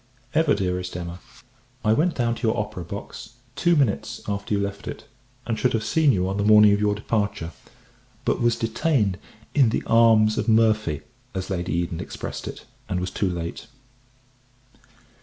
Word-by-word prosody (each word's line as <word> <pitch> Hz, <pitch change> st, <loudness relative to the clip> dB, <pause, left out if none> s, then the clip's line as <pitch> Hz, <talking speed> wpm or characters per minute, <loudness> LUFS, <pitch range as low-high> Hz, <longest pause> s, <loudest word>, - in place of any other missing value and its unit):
EVER 155 Hz, -6 st, +3 dB
DEAREST 90 Hz, -2 st, -2 dB
EMMA, 85 Hz, 0 st, -6 dB, 0.7 s
I 110 Hz, -, +5 dB
went 165 Hz, +8 st, +2 dB
down 120 Hz, -2 st, +1 dB
to 115 Hz, 0 st, -2 dB
your 110 Hz, -, +1 dB
Opera 105 Hz, -4 st, -3 dB
box 100 Hz, +5 st, -8 dB, 0.2 s
two 170 Hz, +4 st, +3 dB
minutes 135 Hz, -10 st, 0 dB
after 100 Hz, 0 st, -2 dB
you -, -, 0 dB
left 100 Hz, 0 st, -4 dB
it; -, -, -7 dB, 0.4 s
and 115 Hz, -2 st, -2 dB
should 125 Hz, -, +2 dB
have 110 Hz, -1 st, 0 dB
seen 150 Hz, +6 st, +3 dB
you 95 Hz, -4 st, +1 dB
on 95 Hz, +1 st, -2 dB
the 100 Hz, -, 0 dB
morning 105 Hz, 0 st, +7 dB
of 100 Hz, -, +1 dB
your 105 Hz, 0 st, +2 dB
departure 100 Hz, -5 st, -2 dB, 0.7 s
but -, -, +1 dB
was 120 Hz, 0 st, +3 dB
detained 115 Hz, -, 0 dB, 0.3 s
in 135 Hz, -6 st, +5 dB
the -, -, -1 dB
arms 110 Hz, -2 st, +5 dB
of -, -, -2 dB
Murphy, 110 Hz, -8 st, +3 dB, 0.3 s
as 95 Hz, +1 st, -4 dB
Lady 90 Hz, -1 st, -2 dB
Eden 85 Hz, -1 st, -1 dB
expressed -, -, -6 dB
it, -, -, -8 dB, 0.2 s
and 90 Hz, -, 0 dB
was 90 Hz, +1 st, -3 dB
too 100 Hz, -, 0 dB
late. 85 Hz, +4 st, -5 dB
105 Hz, 175 wpm, -24 LUFS, 95-115 Hz, 0.7 s, morning